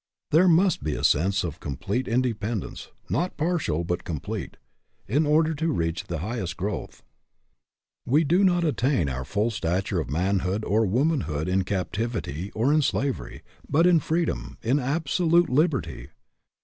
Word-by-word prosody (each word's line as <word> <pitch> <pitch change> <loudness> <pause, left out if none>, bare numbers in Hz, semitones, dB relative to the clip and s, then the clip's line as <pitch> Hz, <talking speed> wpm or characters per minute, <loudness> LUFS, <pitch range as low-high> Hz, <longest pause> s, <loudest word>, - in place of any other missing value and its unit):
There 170 +5 +5
must 180 +1 +3
be 75 - -1
a - - -5
sense 95 +7 +2
of 80 -4 -5
complete 100 - -3
inde 125 +3 +1
pendence, 105 -2 -4 0.2
not 180 -1 -1
partial 155 - 0
but 90 +1 -2
complete, 80 -5 -5 0.5
in 145 +8 +2
order 155 +2 +3
to 160 +2 -2
reach 85 - -2
the 85 - -4
highest 100 -7 -4
growth. 100 +3 -5 1.0
We 150 +6 +4
do 175 +6 +3
not 175 -2 +3
attain 130 - +1
our 65 0 -3
full 105 - -1
stature 95 -1 -1
of 80 - -4
manhood 95 +5 0
or 110 +1 +2
womanhood 110 - 0
in 95 +1 +1
captivity 100 - -3
or 125 +7 +2
in 155 - +4
slavery, 140 -1 -2 0.3
but 165 +4 +3
in 175 -2 +5
freedom, 165 +1 -2
in 125 +6 +2
absolute 165 +5 +2
liberty. 135 - 0
115 Hz, 150 wpm, -25 LUFS, -, 1.0 s, There